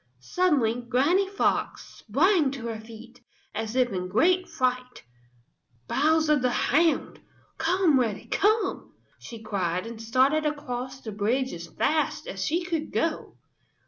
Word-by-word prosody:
Suddenly 245 Hz, -, +1 dB
Granny 340 Hz, +11 st, +2 dB
Fox 400 Hz, -, -1 dB
sprang 310 Hz, -, +2 dB
to 255 Hz, -4 st, -7 dB
her 225 Hz, -2 st, -4 dB
feet, 230 Hz, +2 st, -13 dB, 0.3 s
as 220 Hz, +2 st, -4 dB
if 250 Hz, -2 st, +2 dB
in 180 Hz, -1 st, -3 dB
great 355 Hz, -, +2 dB
fright. 250 Hz, 0 st, -2 dB, 0.8 s
"Bowser 310 Hz, +1 st, +3 dB
the 250 Hz, -2 st, +1 dB
Hound! 315 Hz, +6 st, +1 dB, 0.4 s
Come, 330 Hz, -3 st, +3 dB
Reddy, 225 Hz, -5 st, -2 dB
come!" 420 Hz, -1 st, 0 dB, 0.3 s
she 230 Hz, -2 st, -10 dB
cried, 185 Hz, -3 st, -2 dB
and 230 Hz, -1 st, -8 dB
started 260 Hz, +7 st, +2 dB
across 260 Hz, -3 st, -5 dB
the 220 Hz, -, -6 dB
bridge 235 Hz, +6 st, -1 dB
as 170 Hz, 0 st, -7 dB
fast 310 Hz, -, -1 dB
as -, -, -5 dB
she 340 Hz, +3 st, 0 dB
could 325 Hz, -3 st, -3 dB
go. 330 Hz, -1 st, -2 dB
260 Hz, 135 wpm, -26 LUFS, 225-320 Hz, 0.8 s, Bowser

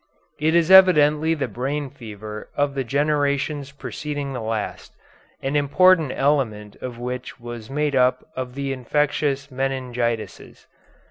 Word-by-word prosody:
It 160 Hz, +2 st, +2 dB
is 170 Hz, +1 st, +3 dB
evidently 160 Hz, -4 st, +6 dB
the 145 Hz, -, -2 dB
brain 140 Hz, +2 st, -3 dB
fever 110 Hz, -4 st, -9 dB
of 145 Hz, -1 st, +1 dB
the 135 Hz, -1 st, -2 dB
generations 140 Hz, +1 st, 0 dB
preceding 145 Hz, 0 st, -5 dB
the 125 Hz, -, -4 dB
last, 110 Hz, -1 st, -4 dB, 0.5 s
an 135 Hz, +2 st, -1 dB
important 155 Hz, +2 st, +4 dB
element 115 Hz, -8 st, 0 dB
of 125 Hz, -2 st, -7 dB
which 125 Hz, +1 st, -6 dB
was 120 Hz, -2 st, -8 dB
made 145 Hz, 0 st, 0 dB
up 125 Hz, 0 st, +2 dB
of 130 Hz, -1 st, -5 dB
the 140 Hz, -1 st, -2 dB
infectious 140 Hz, +1 st, -1 dB
meningitises. 125 Hz, -3 st, -3 dB
135 Hz, 130 wpm, -23 LUFS, 125-150 Hz, 0.5 s, evidently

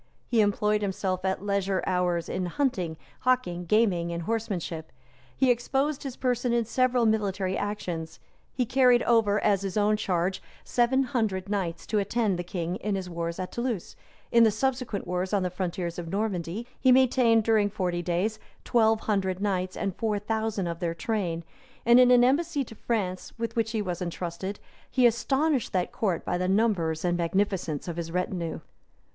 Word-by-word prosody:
He 230 Hz, -2 st, +2 dB
employed 210 Hz, +1 st, +2 dB
himself 190 Hz, -2 st, -2 dB
at 190 Hz, +1 st, -1 dB
leisure 200 Hz, -1 st, 0 dB
hours 180 Hz, -2 st, 0 dB
in 185 Hz, -1 st, -2 dB
hunting, 180 Hz, -, -1 dB, 0.2 s
hawking, 245 Hz, -9 st, 0 dB
gaming, 185 Hz, -5 st, +2 dB
and 170 Hz, 0 st, -3 dB
horsemanship; 180 Hz, -7 st, -3 dB, 0.5 s
he 265 Hz, -2 st, +4 dB
exposed 270 Hz, +4 st, 0 dB
his 270 Hz, -3 st, -5 dB
person 250 Hz, -1 st, 0 dB
in 235 Hz, -1 st, +2 dB
several 250 Hz, +1 st, +2 dB
military 200 Hz, -3 st, 0 dB
actions; 175 Hz, -6 st, -4 dB, 0.3 s
he 250 Hz, -, -1 dB
carried 250 Hz, 0 st, +4 dB
over, 220 Hz, -3 st, +3 dB
at 200 Hz, -2 st, +3 dB
his 195 Hz, 0 st, -3 dB
own 210 Hz, +1 st, +3 dB
charge, 185 Hz, -1 st, -1 dB, 0.2 s
seven 250 Hz, +2 st, +2 dB
hundred 220 Hz, -7 st, -1 dB
knights 190 Hz, -5 st, -2 dB
to 215 Hz, -, 0 dB
attend 205 Hz, -2 st, 0 dB
the -, -, -2 dB
king 175 Hz, 0 st, -3 dB
in 210 Hz, -1 st, -2 dB
his 185 Hz, -2 st, -4 dB
wars 170 Hz, 0 st, -3 dB
at 185 Hz, -1 st, -4 dB
Toulouse; 235 Hz, -6 st, -3 dB, 0.4 s
in 235 Hz, 0 st, +6 dB
the 225 Hz, -, +6 dB
subsequent 245 Hz, -1 st, -1 dB
wars 180 Hz, +2 st, -2 dB
on 200 Hz, -2 st, +2 dB
the 180 Hz, -, -1 dB
frontiers 175 Hz, -1 st, -3 dB
of 170 Hz, -, -6 dB
Normandy, 195 Hz, +1 st, -2 dB
he 260 Hz, -, +5 dB
maintained, 250 Hz, -3 st, +4 dB
during 215 Hz, -2 st, +3 dB
forty 180 Hz, -4 st, -2 dB
days, 185 Hz, +6 st, -1 dB, 0.2 s
twelve 220 Hz, -2 st, +3 dB
hundred 190 Hz, -3 st, 0 dB
knights, 185 Hz, -2 st, -1 dB
and 195 Hz, -3 st, -2 dB
four 220 Hz, -2 st, 0 dB
thousand 220 Hz, -1 st, -2 dB
of 170 Hz, -1 st, -4 dB
their 170 Hz, -2 st, -2 dB
train; 175 Hz, -4 st, -2 dB, 0.4 s
and 240 Hz, +1 st, +7 dB
in 250 Hz, -1 st, +7 dB
an 245 Hz, -1 st, +6 dB
embassy 290 Hz, +3 st, +2 dB
to 230 Hz, -, -11 dB
France, 200 Hz, -5 st, -3 dB
with 230 Hz, 0 st, -3 dB
which 225 Hz, -1 st, +1 dB
he 220 Hz, -2 st, -1 dB
was 180 Hz, -2 st, -4 dB
intrusted, 180 Hz, +3 st, -4 dB, 0.3 s
he 255 Hz, -2 st, +3 dB
astonished 270 Hz, +3 st, +2 dB
that 180 Hz, -2 st, 0 dB
court 190 Hz, -6 st, -1 dB
by 175 Hz, -, -1 dB
the 180 Hz, -, 0 dB
number 195 Hz, -5 st, +2 dB
and 175 Hz, -1 st, +1 dB
magnificence 175 Hz, -3 st, -1 dB
of 170 Hz, -1 st, -4 dB
his 165 Hz, -1 st, -4 dB
retinue. 180 Hz, -2 st, -2 dB
200 Hz, 175 wpm, -27 LUFS, 180-230 Hz, 0.5 s, and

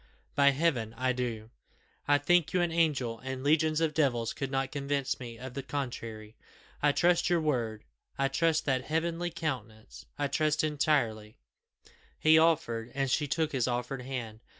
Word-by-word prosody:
By 140 Hz, 0 st, +5 dB
Heaven 135 Hz, -7 st, 0 dB
I 130 Hz, 0 st, +1 dB
do! 115 Hz, -3 st, -4 dB, 0.6 s
I 145 Hz, 0 st, +5 dB
think 160 Hz, +2 st, +2 dB
you 180 Hz, -, +3 dB
an 175 Hz, -1 st, +1 dB
angel, 140 Hz, -9 st, +1 dB
and 130 Hz, +1 st, -5 dB
legions 155 Hz, +1 st, +3 dB
of 160 Hz, -2 st, +1 dB
devils 120 Hz, -7 st, +1 dB
could 135 Hz, -, -4 dB
not 135 Hz, -1 st, -1 dB
convince 140 Hz, -1 st, -2 dB
me 120 Hz, -2 st, -8 dB
of 125 Hz, +2 st, -8 dB
the 140 Hz, -, -4 dB
contrary. 115 Hz, -5 st, -5 dB, 0.5 s
I 145 Hz, -, +4 dB
trust 175 Hz, +4 st, +2 dB
your 175 Hz, -1 st, +3 dB
word 120 Hz, -8 st, -1 dB, 0.3 s
I 135 Hz, -, +2 dB
trust 160 Hz, +3 st, +1 dB
that 130 Hz, -2 st, 0 dB
heavenly 165 Hz, +2 st, -1 dB
countenance 125 Hz, -10 st, -6 dB
I 145 Hz, -, 0 dB
trust 155 Hz, +1 st, +1 dB
entirely 135 Hz, -8 st, 0 dB, 0.4 s
" -, -, -25 dB, 0.3 s
He 160 Hz, 0 st, +6 dB
offered, 120 Hz, -8 st, +1 dB
and 135 Hz, -2 st, 0 dB
she 145 Hz, +2 st, +1 dB
took 155 Hz, +2 st, 0 dB
his 130 Hz, -3 st, 0 dB
offered 125 Hz, +2 st, -2 dB
hand. 120 Hz, -4 st, -5 dB
135 Hz, 170 wpm, -30 LUFS, 120-155 Hz, 0.6 s, He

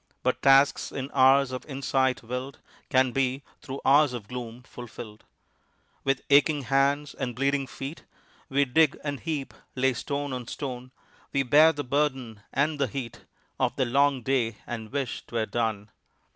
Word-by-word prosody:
But -, -, 0 dB
tasks 135 Hz, +1 st, +4 dB
in 135 Hz, 0 st, -5 dB
hours 135 Hz, 0 st, +5 dB
of 130 Hz, -1 st, -5 dB
insight 135 Hz, -2 st, 0 dB
will'd 125 Hz, +4 st, -5 dB, 0.3 s
Can 130 Hz, -1 st, +3 dB
be 135 Hz, +1 st, -1 dB, 0.2 s
through 140 Hz, -1 st, -7 dB
hours 145 Hz, -1 st, +5 dB
of 115 Hz, -5 st, -6 dB
gloom 125 Hz, 0 st, -7 dB
fulfill'd 115 Hz, -4 st, -10 dB, 0.8 s
With 135 Hz, -1 st, 0 dB
aching 145 Hz, 0 st, +5 dB
hands 140 Hz, +2 st, +1 dB
and 125 Hz, -3 st, -4 dB
bleeding 140 Hz, +1 st, 0 dB
feet 135 Hz, +5 st, -8 dB, 0.4 s
We 140 Hz, +1 st, +2 dB
dig 150 Hz, +3 st, +3 dB
and 145 Hz, -2 st, -3 dB
heap, 155 Hz, -5 st, -4 dB, 0.2 s
lay 130 Hz, 0 st, +2 dB
stone 140 Hz, +2 st, -3 dB
on 125 Hz, -2 st, -5 dB
stone; 130 Hz, -2 st, -6 dB, 0.4 s
We 140 Hz, -, +1 dB
bear 150 Hz, +5 st, +6 dB
the 145 Hz, -2 st, -5 dB
burden 130 Hz, -6 st, -1 dB
and 145 Hz, +2 st, 0 dB
the 140 Hz, -, +2 dB
heat 120 Hz, 0 st, -7 dB, 0.3 s
Of -, -, +1 dB
the 130 Hz, -, +1 dB
long 135 Hz, +1 st, +2 dB
day 120 Hz, -5 st, 0 dB
and 110 Hz, -2 st, -6 dB
wish 140 Hz, -2 st, -3 dB
'twere 115 Hz, -2 st, -1 dB
done. 110 Hz, -3 st, -2 dB
135 Hz, 160 wpm, -27 LUFS, 125-140 Hz, 0.8 s, bear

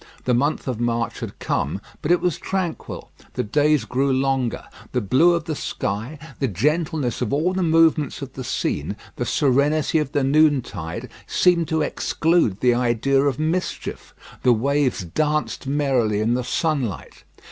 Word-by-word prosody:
The 125 Hz, -, +2 dB
month 140 Hz, +6 st, 0 dB
of 125 Hz, -4 st, -2 dB
March 120 Hz, -1 st, -1 dB
had -, -, -7 dB
come, -, -, -2 dB, 0.2 s
but 150 Hz, -, -3 dB
it 175 Hz, 0 st, +4 dB
was 180 Hz, -3 st, 0 dB
tranquil. 185 Hz, -4 st, -4 dB, 0.2 s
The -, -, -1 dB
days 145 Hz, +2 st, +2 dB
grew 135 Hz, +5 st, 0 dB
longer. 130 Hz, -2 st, 0 dB, 0.3 s
The 125 Hz, -, +2 dB
blue 130 Hz, -, +4 dB
of 170 Hz, -, -2 dB
the 155 Hz, -, -3 dB
sky, 110 Hz, +5 st, -3 dB, 0.2 s
the 135 Hz, -, +1 dB
gentleness 150 Hz, -, 0 dB
of 120 Hz, -, -1 dB
all 160 Hz, +6 st, +1 dB
the 190 Hz, -, -1 dB
movements 165 Hz, -3 st, +3 dB
of 135 Hz, -1 st, -8 dB
the 130 Hz, -, -6 dB
scene, 130 Hz, -, -2 dB, 0.2 s
the -, -, -2 dB
serenity 145 Hz, +3 st, +2 dB
of 150 Hz, -2 st, -3 dB
the 145 Hz, -, +1 dB
noontide, 135 Hz, -, +1 dB, 0.2 s
seemed 175 Hz, -3 st, +3 dB
to 160 Hz, -1 st, +1 dB
exclude 160 Hz, -, +1 dB
the 125 Hz, -1 st, +4 dB
idea 125 Hz, +3 st, +2 dB
of 140 Hz, -2 st, +1 dB
mischief. 160 Hz, +4 st, -3 dB, 0.3 s
The 125 Hz, -, +5 dB
waves 135 Hz, -1 st, +1 dB
danced 150 Hz, -, -1 dB
merrily 135 Hz, -7 st, +1 dB
in 110 Hz, +2 st, +1 dB
the 125 Hz, +1 st, 0 dB
sunlight. 140 Hz, -, -2 dB
140 Hz, 160 wpm, -22 LUFS, 120-155 Hz, 0.3 s, The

